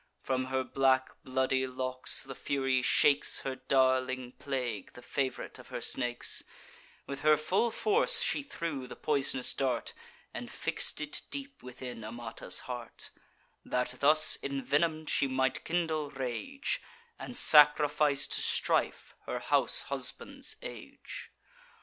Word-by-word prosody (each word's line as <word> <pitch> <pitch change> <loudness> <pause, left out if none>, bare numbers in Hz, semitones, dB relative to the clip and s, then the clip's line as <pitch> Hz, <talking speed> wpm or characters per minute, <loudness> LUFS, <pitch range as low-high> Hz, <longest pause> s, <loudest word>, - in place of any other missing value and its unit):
From 130 -1 -1
her 130 0 -1
black 130 0 +2
bloody 130 0 0
locks 130 0 0
the 135 - -8
Fury 135 -1 0
shakes 140 +3 +3
Her 135 -1 -3
darling 130 -1 +1
plague, 125 -7 -4
the 125 - -13
fav'rite 130 0 -3
of - - -13
her - - -5
snakes; 120 -2 -1 0.6
With 140 - -6
her 155 0 +5
full 190 +10 +1
force 455 - +4
she 470 - +1
threw 165 - -5
the - - -9
poisonous 135 -3 0
dart, 130 -4 -1 0.4
And - - -6
fix'd - - -1
it 150 -1 -2
deep 280 -1 -6
within 125 -2 -8
Amata's 115 +1 -3
heart, 120 -2 -8 0.5
That, 125 0 -2
thus 155 +2 +5
envenom'd, 150 +3 0
she 140 - +2
might 130 0 0
kindle 160 -3 -1
rage, 140 - -3 0.4
And 245 - -7
sacrifice 150 - +6
to - - 0
strife - - 0
her - - -2
house - - +2
and - - -14
husband's - - -4
age. - - -9
135 Hz, 130 wpm, -31 LUFS, 130-150 Hz, 0.6 s, sacrifice